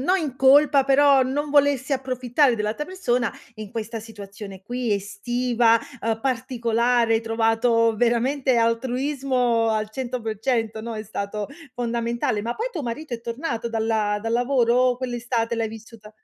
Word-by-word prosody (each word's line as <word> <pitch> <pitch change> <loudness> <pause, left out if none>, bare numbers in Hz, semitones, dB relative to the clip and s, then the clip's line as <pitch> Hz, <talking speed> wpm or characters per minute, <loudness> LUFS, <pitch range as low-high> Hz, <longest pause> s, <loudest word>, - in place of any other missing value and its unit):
no 365 +7 +3
in 300 -8 -3
colpa 275 +1 +5
però 275 0 +5
non 290 +3 -2
volersi 285 -1 +2
approfittare 255 0 +1
dell'altra 215 +7 -2
persona, 275 -11 -1 0.2
in 215 -3 -8
questa 225 +1 -5
situazione 200 -3 -10
qui 245 +1 -3
estiva, 230 +3 +1 0.2
uhm, 225 0 -1
particolare, 235 -2 +1
hai 225 - +2
trovato 225 0 +2
veramente 245 +3 +1
altruismo 250 0 +1
al 215 -1 -1
100% 225 -2 -2
no, 230 0 -6
è 215 - -5
stato 205 0 -4 0.3
fondamentale. 235 -3 -2
Ma 235 +2 -3
poi 455 - -2
tuo 320 - -4
marito 255 +3 -5
è 230 - -7
tornato 235 0 -4
dalla 220 -2 0
dal 225 +2 -3
lavoro, 245 -1 +2
o 250 0 +3
quell'estate 240 -2 -2
l'hai 225 -1 -1
vissuta 220 -1 -12
235 Hz, 145 wpm, -23 LUFS, 225-260 Hz, 0.3 s, colpa